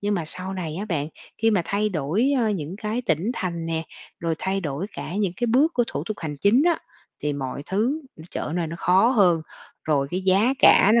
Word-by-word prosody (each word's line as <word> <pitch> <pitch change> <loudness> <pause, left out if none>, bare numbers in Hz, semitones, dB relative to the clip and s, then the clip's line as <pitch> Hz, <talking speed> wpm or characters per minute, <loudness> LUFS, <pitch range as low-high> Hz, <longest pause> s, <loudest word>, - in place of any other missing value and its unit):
Nhưng 205 0 0
mà 170 -4 -1
sau 185 +4 -6
này 165 -4 -4
á 200 - -3
bạn, 155 -7 -2 0.3
khi 225 - +3
mà 195 -5 +2
thay 210 +3 0
đổi, 190 - +1
ơ, 225 -2 +2
những 180 -2 -3
cái 220 +3 -3
tỉnh 175 +10 +1
thành 170 -5 -3
nè, 165 -1 -1 0.4
rồi 165 -1 0
thay 195 +1 -1
đổi 155 +3 -3
cả 175 - -6
những 200 -4 0
cái 240 - 0
bước 275 +8 +3
của 240 - +3
thủ - - -4
tục 215 - -3
hành 150 -3 -4
chính 210 - +4
á, 340 -2 +3 0.4
thì 150 - 0
mọi 140 0 -4
thứ 235 +11 0 0.2
nó 160 - -11
trở 155 - -4
nơi 175 -2 0
nó 165 +2 -6
khó 190 +6 +4
hơn, 180 -9 +4 0.4
rồi 140 -3 +1
cái 185 +2 -1
giá 200 +8 +3
cả 200 - +7
nó 235 - +6
190 Hz, 235 wpm, -24 LUFS, 160-215 Hz, 0.4 s, cả